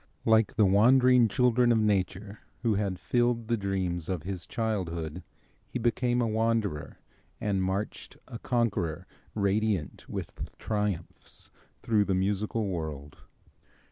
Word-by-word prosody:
Like 110 -2 +4
the 110 -4 +5
wandering 125 +5 +5
children 125 +2 +3
of 115 - +4
nature 100 -1 0 0.2
who 115 -3 +3
had 100 -2 -1
filled 120 +4 0
the 120 - +3
dreams 95 -5 -2
of 90 -5 -2
his 90 -2 -5
childhood, 90 -7 -3 0.5
he - - -3
became 120 +1 +1
a - - +1
wanderer 110 -7 -1 0.4
and 100 -2 0
marched 95 +3 -3
a 115 - -8
conqueror, 105 -12 -1 0.3
radiant 100 -5 0
with - - -6
triumphs, 105 -5 -4 0.3
through 105 -3 +2
the 95 - +1
musical 105 +3 0
world. 75 -6 -5
105 Hz, 125 wpm, -29 LUFS, 95-115 Hz, 0.5 s, the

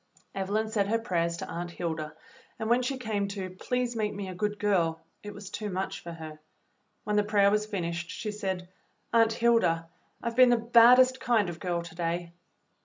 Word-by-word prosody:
Evelyn 205 +3 -1
said 210 -2 0
her 225 +2 +2
prayers 170 -6 -1
to - - -6
Aunt 175 +1 -5
Hilda, 160 -3 -4 0.4
and 220 +1 -2
when 245 +1 +4
she 260 +2 -2
came 215 -5 -2
to 195 -2 -5
"Please 245 +6 -2
make 215 -2 -1
me 200 -1 -5
a - - -5
good 210 +3 -2
girl," 175 -6 +1 0.2
it 210 - -7
was 205 -2 -10
too 215 -2 -4
much 190 0 -3
for 170 - -8
her; 160 -2 -9 0.6
when 210 0 0
the 210 - +4
prayer 205 -1 +3
was 210 0 +1
finished 170 -4 -3
she 215 - -4
said, 190 -3 -4 0.5
"Aunt 225 -1 +5
Hilda, 220 -9 +2 0.3
I've 235 0 -2
been 255 0 +7
the 240 - +4
baddest 245 +3 +6
kind 235 -7 +2
of 165 -2 -7
girl 175 0 -2
to 170 - -10
day." 170 0 -3
205 Hz, 195 wpm, -28 LUFS, 175-225 Hz, 0.6 s, been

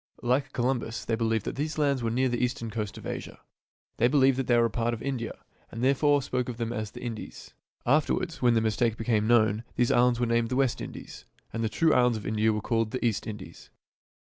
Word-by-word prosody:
Like 130 +3 +1
Columbus 120 -2 -2
they 115 - -1
believed 115 -2 0
that - - -4
these 155 +2 -2
lands 140 -4 +1
were 115 - 0
near 130 +3 +1
the 120 0 -1
eastern 120 -2 -2
coast 105 -3 -4
of - - -10
Asia. - - -6 0.6
They 120 - +4
believed 135 -1 +4
that 135 - -2
they 120 - +4
were 120 - +4
a - - +1
part 120 +1 0
of 110 - -11
India, 130 -4 -3 0.3
and 115 +2 -5
therefore 140 +1 +3
spoke 125 -1 -2
of 120 - -5
them 115 0 -2
as 110 -2 -3
the - - -10
Indies. 115 -3 -7 0.3
Afterwards, 155 +5 +1
when 120 -2 +4
their 110 - +2
mistake 110 +1 +1
became 110 -2 +1
known, 110 -2 +3
these 120 -1 +2
islands 120 0 +3
were 120 - +2
named 115 0 +1
the 125 - -1
West 135 -2 +1
Indies - - -9 0.3
and 115 - -2
the 110 - 0
true 160 +8 +2
islands 125 -2 +3
of 105 - -8
India 110 +1 +2
were 105 0 -2
called 115 0 0
the 130 +2 -3
East 115 -3 0
Indies. 95 -6 -9
120 Hz, 230 wpm, -28 LUFS, 110-130 Hz, 0.6 s, They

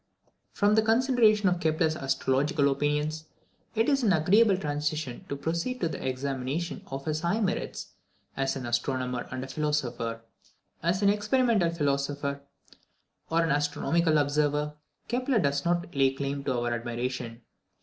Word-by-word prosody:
From 205 +1 +2
the 220 - +5
consideration 225 -2 +3
of 180 -1 +2
Kepler's 160 -1 +1
astrological 140 +1 +1
opinions, 150 +2 -1 0.5
it 225 +1 +2
is 275 -2 +3
an 220 -5 +3
agreeable 190 +5 +4
transition 150 -4 -3
to 140 - -2
proceed 170 - -2
to 170 - +1
the - - -6
examination 135 +5 -3
of 135 0 -6
his 155 -1 -1
high 170 +6 0
merits 200 -4 -2 0.4
as 135 0 0
an 130 -2 -5
astronomer 125 +1 -1
and 130 0 -4
a - - -6
philosopher. 125 -6 -2 0.6
As 180 +5 0
an 200 - +6
experimental 210 -2 +2
philosopher, 140 -2 -1 0.9
or 165 +1 +2
as - - +2
an 165 - 0
astronomical 155 +3 +1
observer, 150 0 +1 0.3
Kepler 250 +1 0
does 140 -5 +1
not 175 0 0
lay 135 -2 +3
claim 140 +1 -3
to 130 -3 0
our 120 0 -1
admiration. 120 0 -4
150 Hz, 150 wpm, -28 LUFS, 135-175 Hz, 0.9 s, an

